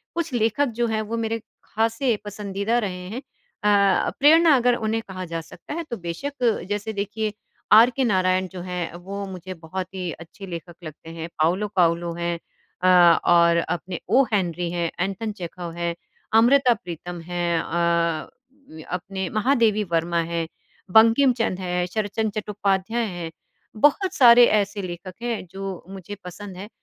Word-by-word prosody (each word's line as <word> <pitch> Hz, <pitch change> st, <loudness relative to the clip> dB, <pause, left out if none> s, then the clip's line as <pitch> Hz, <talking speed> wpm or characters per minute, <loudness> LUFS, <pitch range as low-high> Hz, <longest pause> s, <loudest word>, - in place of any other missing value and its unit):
कुछ 340 Hz, -3 st, -2 dB
लेखक 235 Hz, +4 st, +2 dB
जो 240 Hz, -, +2 dB
हैं 220 Hz, -1 st, -1 dB
वो 225 Hz, +2 st, -4 dB
मेरे 225 Hz, 0 st, -1 dB, 0.2 s
खासे 225 Hz, +2 st, 0 dB
पसंदीदा 205 Hz, +2 st, -2 dB
रहे 180 Hz, -4 st, -4 dB
हैं 235 Hz, -, -4 dB
अ, 205 Hz, -7 st, +1 dB
प्रेरणा 315 Hz, +2 st, +6 dB
अगर 245 Hz, -1 st, +3 dB
उन्हें 225 Hz, 0 st, -1 dB
कहा 185 Hz, -1 st, -6 dB
जा 165 Hz, -1 st, -4 dB
सकता 175 Hz, -, -10 dB
है, 335 Hz, +2 st, -3 dB
तो 240 Hz, -7 st, -6 dB
बेशक 230 Hz, +7 st, -2 dB
जैसे 205 Hz, +1 st, -2 dB
देखिए, 210 Hz, +1 st, -3 dB, 0.4 s
आर 225 Hz, +3 st, +9 dB
के 260 Hz, +2 st, -1 dB
नारायण 185 Hz, -3 st, +2 dB
जो 185 Hz, -1 st, -8 dB
हैं, 180 Hz, -2 st, -4 dB
वो 195 Hz, +3 st, -6 dB
मुझे 185 Hz, 0 st, -7 dB
बहुत 175 Hz, +2 st, -6 dB
ही 180 Hz, -2 st, -3 dB
अच्छे 170 Hz, +5 st, -11 dB
लेखक 170 Hz, -1 st, -7 dB
लगते 155 Hz, 0 st, -10 dB
हैं, 165 Hz, 0 st, -6 dB
पाउलो 185 Hz, +6 st, +2 dB
पाउलो 170 Hz, -1 st, +2 dB
हैं 170 Hz, 0 st, -2 dB, 0.4 s
अ, 185 Hz, -, +2 dB, 0.4 s
और 170 Hz, -1 st, +5 dB
अपने 175 Hz, +1 st, -3 dB
ओ 260 Hz, +5 st, +5 dB
हेनरी 175 Hz, -3 st, 0 dB
हैं, 170 Hz, -1 st, -1 dB
एंटोन 195 Hz, +4 st, -2 dB
चेखव 175 Hz, -3 st, -7 dB
है, 170 Hz, 0 st, -2 dB, 0.5 s
अमृता 255 Hz, +1 st, +5 dB
प्रीतम 175 Hz, 0 st, -7 dB
हैं। 175 Hz, 0 st, -1 dB
अ, 170 Hz, -1 st, 0 dB, 0.4 s
व 160 Hz, 0 st, -10 dB
अपने 190 Hz, +1 st, -3 dB
महादेवी 225 Hz, -2 st, +2 dB
वर्मा 170 Hz, +1 st, +1 dB
है, 165 Hz, -1 st, -1 dB, 0.4 s
बंकिमचन्द्र 225 Hz, -2 st, +4 dB
हैं, 180 Hz, 0 st, -1 dB
शरदचन्द्र 215 Hz, +2 st, -2 dB
चट्टोपाध्याय 205 Hz, +2 st, -1 dB
हैं, 175 Hz, -5 st, -5 dB, 0.4 s
बहुत 295 Hz, -, +3 dB
सारे 240 Hz, -1 st, +8 dB
ऐसे 200 Hz, 0 st, -2 dB
लेखक 185 Hz, 0 st, -7 dB
हैं 235 Hz, -5 st, -3 dB
जो 195 Hz, -1 st, -6 dB
मुझे 195 Hz, +1 st, -8 dB
पसंद 185 Hz, +1 st, -8 dB
हैं, 195 Hz, +2 st, -7 dB
195 Hz, 155 wpm, -23 LUFS, 175-225 Hz, 0.5 s, आर